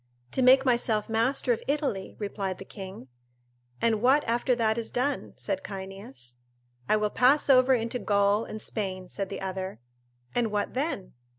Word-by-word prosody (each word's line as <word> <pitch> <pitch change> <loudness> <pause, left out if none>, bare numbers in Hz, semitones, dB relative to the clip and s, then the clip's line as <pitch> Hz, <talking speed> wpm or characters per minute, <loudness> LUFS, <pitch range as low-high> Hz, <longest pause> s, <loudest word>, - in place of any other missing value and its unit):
"To - - 0
make 260 +1 +6
myself 235 -4 +2
master 240 +3 +2
of 225 - -4
Italy," 275 -10 -1
replied 200 -3 -3
the 195 - -9
king. 190 -9 -9 0.7
"And 225 -2 +1
what 270 +4 +4
after 240 +2 +1
that 220 -2 +2
is 230 - -4
done?" 265 +3 -1
said 195 -2 -2
Cyneas. 190 -12 -8 0.5
"I - - +5
will 210 -1 0
pass 275 +3 +4
over 255 0 +6
into 235 +1 -2
Gaul 200 0 +2
and 215 - -7
Spain," 185 -4 -4
said 195 +1 -4
the - - -5
other. 190 0 -4 0.5
"And 240 -2 +1
what 205 -1 -1
then?" 260 - -3
220 Hz, 165 wpm, -28 LUFS, 195-250 Hz, 0.7 s, make